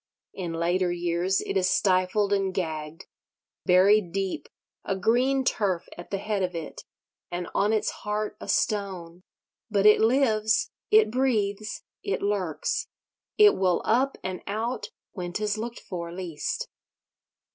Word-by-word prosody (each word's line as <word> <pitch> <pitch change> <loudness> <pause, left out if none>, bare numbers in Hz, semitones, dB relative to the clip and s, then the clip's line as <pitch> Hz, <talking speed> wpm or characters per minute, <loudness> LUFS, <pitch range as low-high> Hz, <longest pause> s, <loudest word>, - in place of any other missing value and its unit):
In 175 -3 -4
later 175 +2 +1
years 175 +2 0
it - - -4
is 185 -1 +3
stifled 190 +1 +2
and 195 -1 +1
gagged—buried 180 +4 0
deep, 195 0 -3 0.3
a 195 - -1
green 250 +7 +2
turf 190 -8 0
at 175 - -10
the 200 - -1
head 205 0 -2
of 180 -1 -1
it, 165 -2 -6 0.5
and 175 0 -4
on 205 +2 +2
its 215 -1 +1
heart 210 0 -2
a - - -7
stone; 185 -5 -1 0.5
but 205 -2 +1
it 210 0 +7
lives, 220 -3 +3 0.2
it 215 0 +5
breathes, 215 -5 0 0.2
it 400 - -2
lurks, 195 -6 -1 0.5
it 420 -1 +7
will 185 -2 +1
up 260 +4 +2
and 185 -1 -4
out 225 +5 -2 0.2
when 175 -3 -5
'tis 210 +1 -1
looked 235 +1 -5
for 170 -2 -6
least. 170 -4 -4
195 Hz, 135 wpm, -26 LUFS, 180-215 Hz, 0.5 s, it